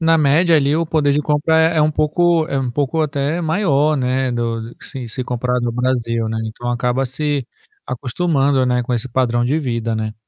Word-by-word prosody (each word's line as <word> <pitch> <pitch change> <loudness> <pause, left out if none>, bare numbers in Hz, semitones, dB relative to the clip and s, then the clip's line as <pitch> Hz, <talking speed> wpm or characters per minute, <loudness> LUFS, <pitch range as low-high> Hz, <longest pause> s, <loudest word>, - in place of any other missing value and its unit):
Na 165 0 +3
média 160 +3 +4
ali 145 -1 +2
o 165 +1 +1
poder 155 -3 +1
de 145 - +2
compra 150 +2 +1
é 160 +1 +3
é 155 - +4
um 155 - +3
pouco 160 +2 +2
é 135 - -1
um 130 -2 -2
pouco 145 +4 -1
até 150 +2 -1
maior, 155 -3 +1
né, 130 0 0
do 115 -1 -3
se 130 -4 -7
se 130 +3 -4
comparado 125 0 -1
ao 120 - -1
Brasil, 115 -2 -1
né. 110 - -3
Então, 110 +2 -6
acaba 125 +2 0
se 140 0 -2 0.4
acostumando, 135 +1 0
né, 125 0 +1
com 125 +1 -4
esse 120 +1 -1
padrão 120 -1 +1
de 135 +5 +1
vida, 115 -5 -2
né. 110 -1 -3
135 Hz, 205 wpm, -19 LUFS, 120-155 Hz, 0.4 s, média